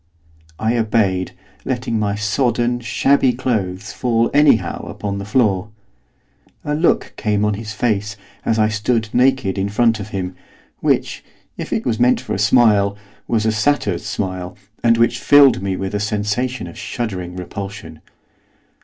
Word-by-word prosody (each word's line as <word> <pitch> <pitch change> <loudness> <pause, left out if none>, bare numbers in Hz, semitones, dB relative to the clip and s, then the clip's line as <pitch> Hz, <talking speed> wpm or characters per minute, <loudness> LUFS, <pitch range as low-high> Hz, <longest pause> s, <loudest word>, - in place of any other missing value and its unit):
I 115 +2 0
obeyed, 105 -5 +1 0.3
letting 120 -3 -2
my 100 -1 0
sodden, 120 +3 0
shabby 130 +2 +2
clothes 105 -7 -2
fall 115 -2 +1
anyhow 145 -5 +3
upon 100 -1 -4
the 100 - -6
floor. 105 -4 +1 1.0
A 150 - -1
look 160 +3 +1
came 105 -1 0
on 105 - +1
his 105 +1 -6
face, 105 -2 -1 0.3
as 115 - +1
I 110 -1 +3
stood 110 +1 -1
naked 125 -6 +2
in 100 +1 -1
front 115 +1 +2
of 100 - -6
him, 95 -2 -4 0.4
which, - - 0 0.3
if - - -6
it - - -1
was 115 -2 -1
meant 125 +1 +4
for - - -5
a - - -2
smile, 105 -2 +4 0.3
was 110 -2 0
a 110 - +3
satyr's 110 -4 0
smile, 95 -3 -4 0.3
and 115 -1 +4
which 115 0 +2
filled 140 -8 +6
me 95 -1 -2
with 95 +1 -4
a 105 - 0
sensation 105 +3 -2
of 85 - -10
shuddering 95 -7 -4
repulsion. 90 -3 -7
110 Hz, 155 wpm, -19 LUFS, 100-120 Hz, 1.0 s, filled